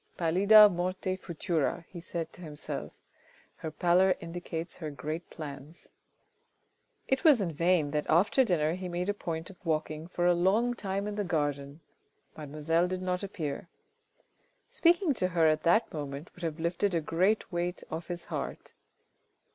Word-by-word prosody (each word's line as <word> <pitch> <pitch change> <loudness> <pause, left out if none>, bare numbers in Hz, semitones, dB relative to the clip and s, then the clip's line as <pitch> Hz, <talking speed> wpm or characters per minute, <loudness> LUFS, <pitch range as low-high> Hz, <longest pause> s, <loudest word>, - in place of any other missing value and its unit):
" - - -36
Pallida 200 +6 +7
morte 185 0 -2
futura? 170 -2 -2
he 175 - -9
said 165 -1 -5
to - - -13
himself 150 -3 -6 0.7
(her 160 - -5
pallor 180 +4 +3
indicates 170 0 -6
her 155 -4 -5
great 155 +4 -5
plans). 145 +1 -9 1.2
It 265 0 +1
was 300 -7 +7
in 185 -5 -1
vain 165 -1 +2
that 150 0 -1
after 195 - +4
dinner 160 -8 +1
he 185 0 -5
made 175 +2 -2
a - - +2
point 165 -2 -5
of 190 - -20
walking 155 -1 -2
for 175 -1 -2
a 175 - +5
long 200 +8 +2
time 200 -3 -3
in 210 0 -4
the 205 - 0
garden, 145 -3 -2 0.5
mademoiselle 155 +3 0
did 185 0 -4
not 180 0 -1
appear. 165 -5 -5 1.0
Speaking 350 - +3
to 185 -7 0
her 170 -2 +2
at 155 0 +3
that 195 +8 +3
moment 145 0 -6
would 180 - -15
have 165 -1 -3
lifted 170 +3 0
a - - +3
great 180 +7 +1
weight 175 0 -2
off 160 +1 -5
his 175 -1 -5
heart. - - -5
175 Hz, 165 wpm, -30 LUFS, 155-185 Hz, 1.2 s, Pallida